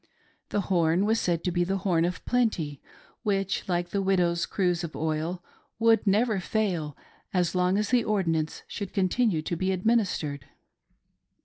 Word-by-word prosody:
The 205 - 0
horn 175 0 +2
was 225 +2 +2
said 170 -2 0
to 180 - 0
be 175 0 +1
the 190 +2 -1
horn 175 -3 +1
of 180 +1 -4
plenty 180 - 0 0.4
which, 195 -2 -1
like 175 -1 0
the 200 - -1
widow's 175 -3 +1
cruse 180 -3 0
of 165 - -6
oil, 160 +3 -2 0.3
would 225 -1 +3
never 215 +1 +3
fail 180 -7 -1 0.4
as 175 -2 +2
long 180 +1 +2
as 210 0 0
the 245 -2 +3
ordinance 165 -8 -1
should 200 -2 -6
continue 195 -3 +1
to 170 - -2
be 185 +3 0
administered. 185 - 0
185 Hz, 155 wpm, -27 LUFS, 170-205 Hz, 0.4 s, would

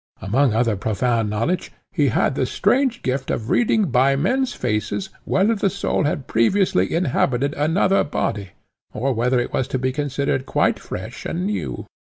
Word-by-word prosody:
Among 125 +7 +2
other 115 0 +1
profound 110 +2 0
knowledge, 115 - -1 0.2
he 145 -5 +2
had 125 - +1
the 130 -1 -1
strange 240 - +1
gift 130 +1 -2
of 110 - -2
reading 220 - +2
by 130 +3 +4
men's 250 - +1
faces 120 - -2 0.2
whether 200 +4 +2
the 200 -2 +1
soul 200 -5 -1
had 145 -2 -1
previously 115 - +2
inhabited 140 -4 +1
another 170 +6 +2
body, 100 -8 -2 0.5
or 135 +4 0
whether 125 +2 +1
it 120 - -3
was 130 - 0
to - - -2
be 130 +1 0
considered 140 -1 -2
quite - - +1
fresh - - -7
and 85 +4 -2
new. 90 -12 -3
130 Hz, 165 wpm, -21 LUFS, 115-180 Hz, 0.5 s, by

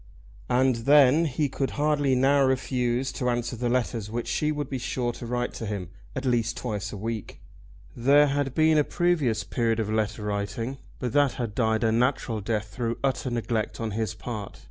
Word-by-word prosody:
And 125 0 +3
then 145 +2 +6
he 150 0 0
could 135 0 -2
hardly 145 -2 +2
now 135 +2 +4
refuse 130 -1 0
to 125 - -1
answer 120 0 -1
the 120 +1 -1
letters 120 -4 -1
which 120 +2 -3
she 150 0 0
would 145 -2 -3
be 130 -1 -4
sure 120 0 -1
to 120 - -8
write 120 +1 -2
to 115 - -5
him, 100 -5 -4 0.3
at 130 - -3
least 120 -2 +1
twice 105 -5 -3
a 105 - -6
week. 110 +1 -5 0.6
There 140 +5 +5
had 140 -2 -1
been 155 -1 +4
a - - +4
previous 155 -10 +1
period 115 -2 0
of 110 -1 -1
letter 110 0 -1
writing, 105 +6 -3 0.2
but 125 -1 -3
that 145 -3 +4
had 115 -4 -4
died 110 0 +1
a 110 - +3
natural 120 -2 +1
death 105 0 -2
through 115 +2 -2
utter 135 -1 0
neglect 115 -2 -2
on 115 -1 -2
his 110 +1 -2
part. 110 -5 -6
120 Hz, 190 wpm, -26 LUFS, 110-135 Hz, 0.6 s, then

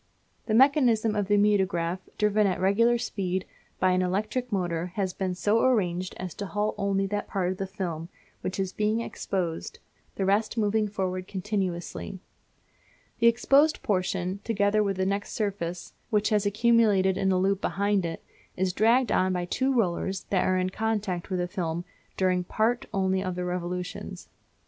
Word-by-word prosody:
The 215 - +1
mechanism 240 -5 +4
of 205 -2 0
the 205 0 +3
mutograph, 190 -4 +2 0.2
driven 210 -1 +3
at 185 - -1
regular 230 +6 +3
speed, 190 -5 -2 0.3
by 185 - +3
an 185 0 +2
electric 215 +7 -1
motor, 175 -3 -1
has 190 -3 -1
been 185 -2 -2
so 205 +6 +2
arranged 185 -8 +1
as 185 -2 -5
to 200 - -5
halt 210 +2 -1
only 195 0 +1
that 205 +1 -3
part 185 -2 -1
of 185 - -6
the 195 - -2
film 175 -4 -5 0.3
which 185 - -4
is 190 -1 -1
being 215 +2 0
exposed, 180 -7 -3 0.4
the 195 - -1
rest 210 +4 +1
moving 215 0 +2
forward 185 -2 -3
continuously. 190 -1 -3 1.0
The 235 - +5
exposed 275 +6 +4
portion, 185 -1 -1
together 210 -1 +2
with 200 -2 0
the 190 - +1
next 200 +1 -2
surface, 185 -5 -3 0.2
which 210 -2 +2
has 210 -2 +2
accumulated 210 -3 +3
in 190 0 +1
a 185 - +2
loop 195 +1 +1
behind 200 -1 +1
it, 165 -1 -5 0.3
is 185 0 0
dragged 235 +5 +3
on 185 0 +2
by 180 -1 -1
two 260 +9 0
rollers 190 -5 0
that 190 -2 +2
are 185 - +2
in 185 0 0
contact 210 -5 -2
with 185 - -1
the 180 0 -1
film 175 -3 -3 0.3
during 185 -1 +2
part 230 +7 0
only 190 -2 +1
of 185 -2 -3
their 180 0 -3
revolutions. 180 0 -5
195 Hz, 170 wpm, -27 LUFS, 185-215 Hz, 1.0 s, The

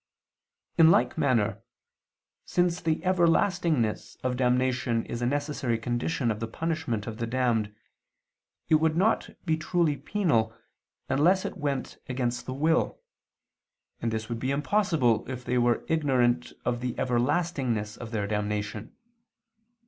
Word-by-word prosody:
In 160 -1 +8
like 125 -7 +3
manner, 130 -9 +1 0.8
since 175 0 0
the 160 0 0
everlastingness 170 - +2
of 130 -1 0
damnation 125 -2 +1
is 120 - -5
a 120 - +1
necessary 140 -4 -1
condition 120 +3 -1
of 105 - -3
the 115 - -3
punishment 155 -5 -2
of 110 -2 -6
the 115 - -2
damned, 115 -4 0 0.9
it - - +1
would 160 0 +2
not 215 +5 +2 0.2
be 160 -2 +1
truly 160 -1 +1
penal 115 - 0 0.5
unless 170 +8 +3
it - - -4
went 140 -3 -3
against 125 -1 -2
the 130 - -3
will; 160 +4 +1 1.0
and 120 - 0
this 110 0 -3
would 115 -1 -4
be 130 - -2
impossible 145 - +2
if 125 -1 -6
they 125 - +1
were 120 -1 +2
ignorant 125 -6 +1
of 120 -1 0
the 125 -1 -2
everlastingness 125 -4 0
of 115 - -8
their 110 -3 -2
damnation. 105 +1 -3
125 Hz, 135 wpm, -27 LUFS, 115-160 Hz, 1.0 s, In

